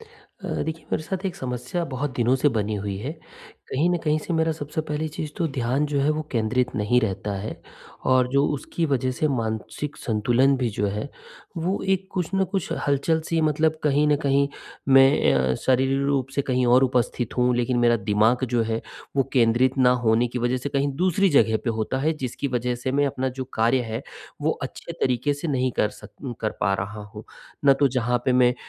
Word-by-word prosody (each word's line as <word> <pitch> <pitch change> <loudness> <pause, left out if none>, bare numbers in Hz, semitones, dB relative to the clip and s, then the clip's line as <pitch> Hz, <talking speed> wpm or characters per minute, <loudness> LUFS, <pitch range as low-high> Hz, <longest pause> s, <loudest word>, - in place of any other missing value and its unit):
अ, 455 0 -7
देखिए 160 0 -5
मेरे - - 0
साथ 190 +4 -4
एक 180 - -4
समस्या 125 +7 -3
बहुत 145 +3 -2
दिनों 120 +1 +3
से 145 - +3
बनी 105 -1 0
हुई 100 -1 -3
है, 130 +9 -4 0.6
कहीं 150 +6 +2
न 175 - +2
कहीं 155 0 +2
से 165 - -5
मेरा 160 0 +2
सबसे 155 0 -4
पहली 150 +1 -2
चीज़ 155 0 -5
तो 170 - 0
ध्यान 135 +1 0
जो 145 -1 0
है, 140 +2 +2
वो 155 0 -1
केंद्रित 125 +2 0
नहीं 110 +4 +2
रहता 100 -2 -2
है 105 +3 -6 0.5
और 130 -1 +4
जो 140 +1 +4
उसकी 165 +4 -2
वजह 130 -3 0
से 155 - +2
मानसिक 115 +2 -3
संतुलन 120 +5 +2
भी 125 -2 0
जो 105 0 -1
है, 105 +6 -4 0.5
वो 175 +4 -1
एक 190 0 0
कुछ 180 -3 -2
न 195 0 +3
कुछ 195 -4 -1 0.2
हलचल-सी 160 +4 +1
है 160 - +2
मतलब 155 +1 +2
कहीं 150 0 +3
न 150 - +4
कहीं 140 0 +3 0.4
मैं 135 - +6
अ, 65 -1 +2
शारीरिक 130 - +1
रूप 135 -2 0
से 140 - +1
कहीं 125 -2 +1
और 125 +2 +5
उपस्थित 125 -2 -1
हूँ, 125 0 +3
लेकिन 125 0 +1
मेरा 120 -1 +4
दिमाग 110 +4 +2
जो 120 -2 +2
है 115 0 -2 0.4
वो 135 - +5
केंद्रित 125 +2 +3
ना 125 -1 +5
होने 115 +2 +3
की 125 - -4
वजह 120 +1 0
से 130 +3 -4
कहीं 140 0 0
दूसरी 185 +3 +2
जगह 110 -6 +4
पे 120 - +1
होता 110 +3 -2
है, 155 +4 +1
जिसकी 140 -2 -4
वजह 125 -1 -1
से 125 +2 -3
मैं 145 +1 +2
अपना 130 -1 -1
जो - - -2
कार्य 115 +4 +3
है, 115 +4 -3 0.4
वो 150 +2 +1
अच्छे 130 +5 -6
तरीके 135 -2 0
से 145 +4 -5
नहीं 130 -3 +1
कर 105 - +3
सक - - -13
उ 130 - -3
कर 110 - 0
पा 100 - +2
रहा 100 +2 -5
हूँ। 105 - -8 0.4
ना 140 - +8
तो 140 +1 +3
जहाँ 125 -1 0
पे 130 - +2
मैं 125 -1 +4
130 Hz, 215 wpm, -24 LUFS, 120-150 Hz, 0.6 s, ना